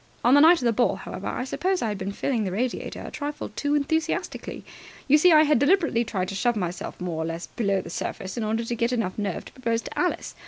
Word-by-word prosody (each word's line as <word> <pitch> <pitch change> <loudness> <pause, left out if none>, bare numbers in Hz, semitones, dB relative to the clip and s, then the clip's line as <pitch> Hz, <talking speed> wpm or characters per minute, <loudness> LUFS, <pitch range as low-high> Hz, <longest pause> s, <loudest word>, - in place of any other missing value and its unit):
On 245 - +5
the 285 - +7
night 335 +3 +8
of 260 - -5
the 235 - +3
ball, 240 +2 +2
however, - - -7
I - - -2
suppose 365 +7 -1
I 225 - 0
had 205 -2 -4
been 195 +1 -3
filling 230 +2 -1
the 190 - -2
radiator 240 +6 -3
a - - -7
trifle 295 0 -5
too 290 0 -1
enthusiastically. 315 +3 -2 0.4
You 295 +2 +6
see, 360 +3 +6
I 310 -1 +7
had 300 -4 +3
deliberately 290 -5 +3
tried 190 -5 -2
to - - -5
shove 240 +4 +1
myself 180 -3 -4
more 175 -3 -3
or - - -1
less 165 +1 -4
below 200 -5 -1
the - - -9
surface 190 +2 -4
in 235 - -2
order 220 +2 -1
to 235 - -2
get 235 +1 0
enough 225 -6 -2
nerve 200 -4 -3
to - - -13
propose 230 -3 -1
to - - -8
Alice. - - -1
235 Hz, 250 wpm, -25 LUFS, 195-285 Hz, 0.4 s, night